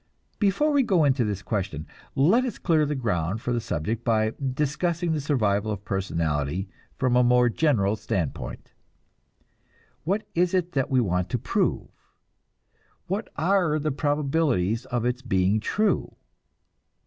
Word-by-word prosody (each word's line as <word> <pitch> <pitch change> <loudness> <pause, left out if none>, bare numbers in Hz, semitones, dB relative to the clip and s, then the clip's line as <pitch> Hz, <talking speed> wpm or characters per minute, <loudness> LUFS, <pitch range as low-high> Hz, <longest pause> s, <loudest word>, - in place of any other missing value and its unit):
Before 210 +9 +2
we 285 -1 +4
go 190 -10 +3
into 135 -3 +3
this 105 -2 -3
question, 95 -8 -3 0.3
let 185 - +4
us 250 - -3
clear 155 -4 +2
the 150 - -1
ground 100 - -1
for 125 +2 -2
the 120 - 0
subject 110 +2 -3
by 110 -2 +1 0.2
discussing 165 +4 0
the 155 -2 0
survival 110 -7 +1
of 100 -1 -5
personality 85 -2 -1 0.3
from 130 -2 +1
a 125 - +5
more 125 0 +4
general 110 -7 +2
standpoint. 90 -7 -4 1.3
What 200 +6 -1
is 180 +2 +2
it 180 -1 0
that 135 -2 0
we 130 -2 +3
want 90 -4 0
to - - 0
prove? - - -1 1.2
What 200 +5 -3
are 175 -1 +2
the 155 0 -1
probabilities 140 - 0
of 120 -2 -2
its 125 +1 -1
being 100 -3 +1
true? 210 - 0
125 Hz, 145 wpm, -25 LUFS, 105-160 Hz, 1.3 s, a